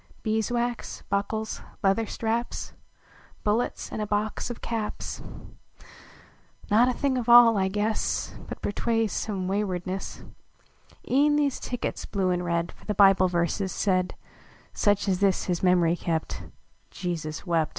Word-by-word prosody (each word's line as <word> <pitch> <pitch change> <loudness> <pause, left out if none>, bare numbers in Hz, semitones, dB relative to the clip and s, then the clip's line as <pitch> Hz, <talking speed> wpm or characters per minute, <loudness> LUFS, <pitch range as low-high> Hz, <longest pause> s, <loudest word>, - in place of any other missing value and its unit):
Beeswax 235 +2 -1
buckles 215 +2 -1 0.2
leather 195 +3 +2
straps 230 +3 -2 0.7
Bullets, 215 +4 0
and - - -3
a 210 - -2
box 210 +3 -1
of 240 - -6
caps, 225 -2 -4 1.5
Not 235 +4 +5
a - - +1
thing 260 0 0
of 240 -1 -3
all, 235 -1 +9
I 190 -1 +2
guess, 210 +3 -1
But - - -8
betrays 225 0 0
some 195 -4 -2
waywardness 190 -1 -3 0.8
E 280 +3 +4
en 295 - +3
these 285 -3 +1
tickets, 245 -1 -4
blue 190 -2 0
and 180 0 0
red, 170 0 -1
For - - -19
the 210 - -2
Bible 195 -1 +6
verses 180 +2 0
said 185 -3 0 0.6
Such 205 -1 +2
as 185 -2 +1
this 195 -2 +2
his 175 -2 -1
mem 180 -1 +4
ry 165 0 +3
kept 165 -2 -3 0.4
"Jesus 165 -3 -4
wept." 165 -4 +1
205 Hz, 140 wpm, -26 LUFS, 185-225 Hz, 1.5 s, all